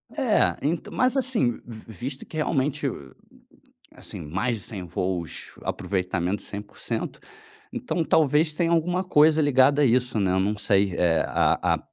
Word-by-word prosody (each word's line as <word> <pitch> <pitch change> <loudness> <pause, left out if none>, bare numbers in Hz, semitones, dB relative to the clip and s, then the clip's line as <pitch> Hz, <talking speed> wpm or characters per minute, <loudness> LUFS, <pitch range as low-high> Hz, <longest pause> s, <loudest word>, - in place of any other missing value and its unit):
É, 260 -7 +2
ent 155 +4 -2
mas 255 +2 +1
assim, 245 - +1
v 115 -1 -11
visto 130 +7 -6
que 155 - -9
realmente, 145 -1 0
hum, 70 - -9 0.8
assim, - - -9
mais 95 +11 -1
de - - -5
100 100 -5 -4
voos, 90 -1 -4
aproveitamento 95 0 -2
100% 105 +3 -5 0.5
então, 235 -9 -2
talvez 155 0 +3
tenha 165 +2 0
alguma 175 +3 +1
coisa 155 -2 +4
ligada 145 0 +4
a - - +5
isso, 125 -2 +2
né, 95 -3 +1
eu 95 - +2
não 105 +3 0
sei, 100 -2 +2
eh, 85 -2 +2
a - - +2
a - - -2
125 Hz, 155 wpm, -25 LUFS, 100-155 Hz, 0.8 s, a